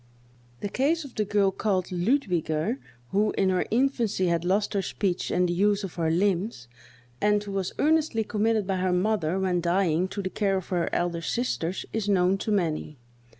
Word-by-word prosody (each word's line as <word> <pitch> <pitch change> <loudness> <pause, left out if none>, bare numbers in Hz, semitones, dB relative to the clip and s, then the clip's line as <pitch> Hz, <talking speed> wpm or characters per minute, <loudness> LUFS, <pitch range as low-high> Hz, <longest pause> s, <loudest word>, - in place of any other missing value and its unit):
The - - -1
case 295 +8 +1
of 275 - -11
the 215 - -1
girl 200 -1 +2
called 190 -2 -1
Ludwiger, 180 - 0 0.3
who, 210 +2 +2
in 195 - +3
her 185 -1 +1
infancy, 235 -5 +1
had 170 -1 +1
lost 195 +3 +1
her 200 - +1
speech 190 -1 -2
and 180 0 +2
the 175 - -1
use 205 +3 +2
of 195 - -5
her 165 -2 0
limbs, 180 - 0 0.5
and 210 0 +3
who 205 - -7
was 195 -2 -2
earnestly 305 -7 +2
committed 215 0 0
by 190 0 -1
her 185 0 +1
mother, 185 -2 +1
when 185 -2 +1
dying, 175 0 +1
to 200 +1 -5
the 185 - -3
care 195 -2 +1
of 190 - -6
her 175 -2 0
elder 175 -1 -1
sisters, 190 -4 -2
is 215 -2 -1
known 190 0 +3
to 215 - -2
many. 160 -6 -1
195 Hz, 190 wpm, -26 LUFS, 180-210 Hz, 0.5 s, in